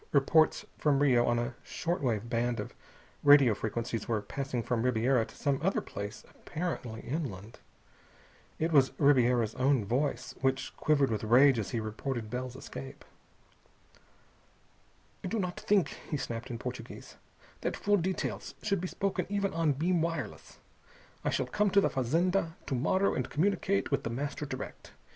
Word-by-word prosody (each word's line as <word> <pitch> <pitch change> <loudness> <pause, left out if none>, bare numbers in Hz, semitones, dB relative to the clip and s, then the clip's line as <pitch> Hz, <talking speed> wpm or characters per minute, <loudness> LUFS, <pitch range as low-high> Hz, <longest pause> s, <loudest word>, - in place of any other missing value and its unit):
Reports 155 +3 +4
from 145 -2 +3
Rio 130 -4 +4
on 120 - +2
a 120 +2 -2
short 170 +2 -3
wave 120 -4 0
band 120 0 0
of - - -5 0.5
radio 145 -5 +7
frequencies 110 +1 -3
were 115 -2 +1
passing 135 -2 -3
from 120 -1 0
Ribiera 125 0 +2
to - - -15
some 140 -2 0
other 190 +5 +1
place 100 +1 -7
apparently 145 -9 -5
inland. 115 - -5 1.0
It 160 +2 0
was 140 -4 +4
Ribiera's 125 -5 +4
own 130 -3 +2
voice, 125 +3 -1
which 135 0 0
quivered 140 -4 +2
with 110 -1 -2
rage 125 +3 +6
as 105 - -3
he 120 - -1
reported 110 +1 -4
Bell's 125 0 -4
escape. 135 0 -9 2.2
"I - - -2
do 225 - -1
not 180 -3 -2
think," 200 -3 +2 0.2
he 150 - -1
snapped 120 0 -5
in 120 - -4
Portuguese, 125 -1 -8 0.4
"that - - -2
full 205 0 +2
details 185 +1 -3
should 200 -4 0
be 185 - -2
spoken 190 -1 -2
even 200 -1 0
on 165 -3 +2
beam 170 +5 +1
wireless. 165 0 -4 0.7
I - - +1
shall - - 0
come 210 0 +1
to 200 +1 +5
the - - +1
fazenda 165 +6 +1
_to 135 - -2
morrow 185 +10 +2
and 130 -1 -2
communicate 195 +3 +1
with 140 - +2
The - - -4
Master 145 +4 -3
direct. 130 -1 -7
135 Hz, 160 wpm, -31 LUFS, 120-165 Hz, 2.2 s, radio